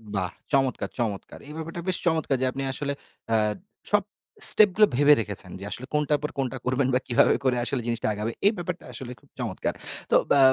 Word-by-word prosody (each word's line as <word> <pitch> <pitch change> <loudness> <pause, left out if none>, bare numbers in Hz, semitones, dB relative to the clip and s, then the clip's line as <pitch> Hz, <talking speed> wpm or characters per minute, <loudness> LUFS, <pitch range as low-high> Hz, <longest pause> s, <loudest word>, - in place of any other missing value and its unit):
বাহ! 95 -2 -1 0.2
চমৎকার, 135 -2 +1
চমৎকার। 105 -5 -3
এই 150 - -9
ব্যাপারটা 165 +2 -6
বেশ 185 - +1
চমৎকার 160 -5 +1
যে - - +2
আপনি 135 +1 -4
আসলে 140 +1 -3 0.4
আ - - +4 0.6
সব 205 -1 +3 0.5
স্টেপ 210 -1 +7
গুলো 210 0 +6
ভেবে 145 +3 +6
রেখেছেন 100 -4 -6
যে - - -9
আসলে 130 - -5
কোনটার 150 0 +1
পর 150 - -1
কোনটা 130 -1 -2
করবেন 130 +1 +1
বা 125 - +3
কিভাবে 120 - +4
করে 130 -2 +2 0.3
জিনিসটা 115 -1 -1
আগাবে। 105 +2 -3 0.2
এই 210 - +4
ব্যাপারটা 175 0 -5
আসলে 125 +1 -7
খুব 140 - -26
চমৎকার। 115 -6 -2 0.4
তো - - +5 0.2
বা 140 - +5
135 Hz, 195 wpm, -25 LUFS, 120-155 Hz, 0.6 s, স্টেপ